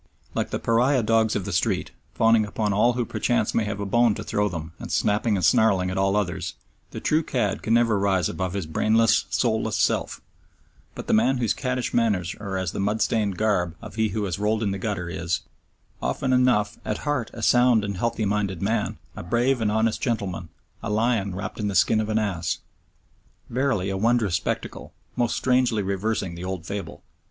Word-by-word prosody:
Like - - -1
the - - -2
pariah 125 +3 +2
dogs 110 0 +2
of 95 - -2
the 100 - -4
street, 85 - 0 0.2
fawning 115 -1 +4
upon 105 0 -1
all 120 +5 +3
who 120 0 -1
perchance - - 0
may 110 - +1
have 100 -1 -4
a 100 - -2
bone 120 +1 +3
to - - -6
throw 105 0 0
to - - -10
them 80 -1 -6
and - - -7
snapping 105 +1 +1
and 90 -4 +1
snarling 95 -3 +3
at 95 - -4
all 95 +1 +2
others, 90 -5 -2 0.3
the - - -7
true 155 +1 +2
cad 130 -5 -1
can 115 - +2
never 115 -3 +3
rise 95 -4 +2
above 95 -2 -3
his 100 -4 -3
brainless, 110 +7 +2
soulless 110 -2 0
self, - - 0 0.8
but - - -7
the - - 0
man 125 +5 +3
whose 120 -4 +1
caddish 125 -2 -2
manners 100 -7 +1
are 100 -2 -4
as 95 -2 -2
the - - -5
mud 105 +3 0
stained 105 -5 0
garb 90 -6 +1
of 110 -2 -10
he 110 0 +1
who 105 +2 -2
has 95 -2 -3
rolled 110 +2 +1
in 100 - 0
the 95 - -3
gutter 95 -4 -3
is, 85 0 -2 0.6
often 130 -1 0
enough, 125 -5 +2
at - - -4
heart 145 -6 -1
a 115 - -6
sound 120 -2 +4
and 100 -2 -4
healthy 115 +1 -1
minded 100 -3 -1
man, 105 +3 -1 0.2
a - - -6
brave 120 +7 +1
and 105 -2 +1
honest 110 +1 +1
gentleman, 100 -8 -2 0.3
a 115 - -4
lion 105 -3 0
wrapped 95 - -5
in 105 - -1
the 100 - -2
skin 110 +2 +4
of 110 - -4
an 110 - +1
ass! 95 -6 -1 0.9
Verily 120 -7 0
a 95 - -2
wondrous 115 -2 +2
spectacle, 90 - -3 0.2
most 120 -2 0
strangely 125 -4 +2
reversing 100 -1 -2
the 85 +1 -8
old 90 -3 -4
fable! 100 +2 -6
105 Hz, 205 wpm, -24 LUFS, 95-115 Hz, 0.9 s, fawning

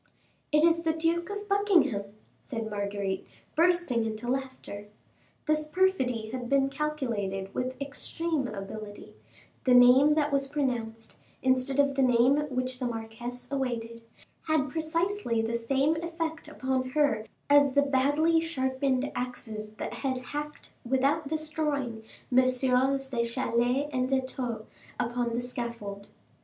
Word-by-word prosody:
"It 300 +1 +4
is 335 0 +4
the 325 -1 +1
Duke 335 +2 0
of 410 0 -5
Buckingham," 350 - +3 0.4
said 225 -3 -5
Marguerite, 200 -2 -3 0.3
bursting 340 -8 +3
into 220 +1 -4
laughter. 260 -6 -5 0.6
This 305 0 +2
perfidy 260 - +1
had 245 -1 -5
been 275 0 +3
calculated 230 -10 -2
with 255 +1 -3
extreme 285 +1 -2
ability; 205 0 -8 0.5
the 250 -1 +6
name 255 +4 +7
that 295 -1 +1
was 275 -1 +1
pronounced, 240 -6 -3 0.3
instead 260 +1 +2
of 280 0 +4
the 270 - +1
name 250 +2 +5
which 255 -1 -2
the 250 - -1
marquise 235 +2 -6
awaited, 235 -4 -3 0.5
had 300 -4 +1
precisely 330 - 0
the 225 +1 -2
same 270 +6 +1
effect 330 -1 -4
upon 260 -3 -1
her 280 -6 +2 0.2
as 285 -1 +5
the 285 +1 +4
badly 290 +4 +3
sharpened 265 -4 0
axes, 220 -4 -5
that - - -5
had 265 -2 -2
hacked, 295 +4 -6
without 275 +5 +1
destroying, 300 -6 -2 0.3
Messieurs 255 +1 +3
de 240 -3 0
Chalais 245 +3 0
and 255 0 0
de 270 -1 +3
Thou 245 -4 -4 0.3
upon 240 -1 -1
the 240 - 0
scaffold. 235 -5 -5
260 Hz, 130 wpm, -29 LUFS, 235-300 Hz, 0.6 s, name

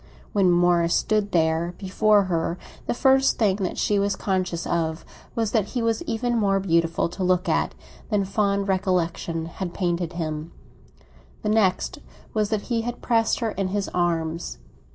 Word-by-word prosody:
When 195 -3 +4
Morris 175 -1 +3
stood 210 -2 +1
there 165 +1 +1
before 205 +1 +3
her, 170 -2 -1 0.3
the - - 0
first 265 +1 +4
thing 200 -4 +2
that 190 -3 -3
she 205 -1 +2
was 200 0 +1
conscious 185 -3 -1
of 160 -1 -1 0.3
was 225 -2 0
that 220 -5 +2
he 235 - 0
was 230 +4 +1
even 240 0 0
more 195 -2 +2
beautiful 170 -3 +1
to 185 +2 -4
look 180 +1 +2
at - - +1 0.3
than 205 -3 +1
fond 200 0 0
recollection 175 -3 0
had 175 +1 -6
painted 175 -2 -1
him; 155 -1 -4 0.9
the 210 - 0
next 210 -4 +1 0.3
was 215 -2 +1
that 215 -2 0
he 235 0 -1
had 240 +1 -5
pressed 230 0 +2
her 225 -2 0
in 195 -2 -2
his 200 +1 -2
arms. 165 - -1
190 Hz, 165 wpm, -24 LUFS, 170-210 Hz, 0.9 s, When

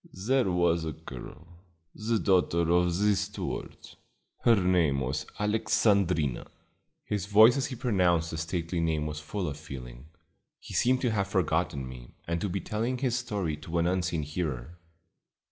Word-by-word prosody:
"There 130 -5 +3
was 85 -2 +2
a 80 -1 -3
girl, 80 +2 -10 0.5
the 110 +1 -1
daughter 85 -4 +2
of 90 0 +3
the 105 +1 +3
steward; - - -4 0.6
her 115 - +5
name 90 -8 +2
was 70 +4 -2
Alexandrina." 100 - +1 0.6
His 100 -2 -2
voice 110 +4 +7
as 140 - 0
he 130 - -6
pronounced 90 -9 +1
the 80 - -4
stately 85 +1 -2
name 80 -2 0
was 75 0 -4
full 90 +4 -4
of 75 -1 -4
feeling. 65 -4 -9 0.5
He - - -11
seemed 130 +1 +2
to 125 - +1
have 100 -3 0
forgotten 80 -7 0
me, 60 -1 -11
and 85 0 -1
to 100 - -1
be 95 +2 -2
telling 115 +4 -2
his 125 -2 0
story 100 -10 -2
to 80 +3 -4
an 85 - +2
unseen 90 -3 0
hearer. 75 0 -4
85 Hz, 160 wpm, -28 LUFS, 80-105 Hz, 0.6 s, voice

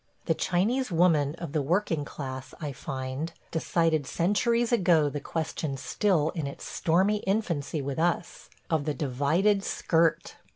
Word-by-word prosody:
The - - +2
Chinese 220 +7 0
woman 160 -4 +3
of 170 -3 -6
the 155 -1 0
working 165 0 0
class, 130 -2 -7
I 150 -4 -4
find, 135 +3 -4 0.2
decided 165 -2 +1
centuries 230 +7 +1
ago 175 -9 +4
the 145 - -4
question 155 -2 -3
still 165 0 +1
in 160 -5 -3
its 140 - -8
stormy 190 +5 +2
infancy 175 -8 -1
with 140 +2 -3
us 170 +1 -1
– - - -38
of 155 -3 +1
the 150 -2 -1
divided 155 +10 +1
skirt. 165 -3 +1
160 Hz, 150 wpm, -28 LUFS, 145-185 Hz, 0.2 s, ago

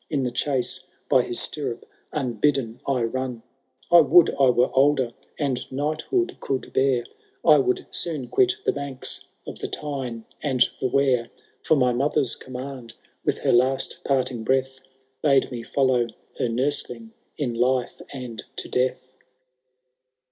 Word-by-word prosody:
In 140 -3 0
the 125 - -1
chase, 130 +1 -1 0.2
by 130 - +6
his 120 - +1
stirrup, 140 -6 -2 0.3
unbidden 130 -3 0
I 130 -3 +1
run; 125 0 -3 0.5
I 175 -1 +9
would 160 +3 +6
I 135 -2 +3
were 125 0 +3
older, 135 -2 +3 0.3
and 135 -4 -2
knighthood 155 - -1
could 135 -1 -3
bear, 130 -2 +2 0.4
I - - +7
would 375 -1 0
soon 150 -7 -1
quit 380 0 +3
the - - +4
banks 140 -2 -2 0.2
of - - -8
the - - -3
Tyne 130 -6 -5 0.2
and 135 -4 -1 0.2
tJie 130 - -1
Wear: 130 -4 +2 0.3
For 155 - +3
my 125 -2 +3
mother^s 135 0 +1
command, 130 -2 -8 0.3
with - - 0
her - - +4
last 130 +2 +2
parting 130 -4 0
breath, 130 +2 0 0.4
Bade 140 -3 +3
me 120 -2 -4
follow 125 -1 +1 0.3
her 120 - +1
nursling 120 -2 -1 0.3
in 130 -5 -1
life 125 +1 0
and 125 -5 -6
to - - -4
death. 130 0 -1
130 Hz, 145 wpm, -24 LUFS, 125-140 Hz, 0.5 s, I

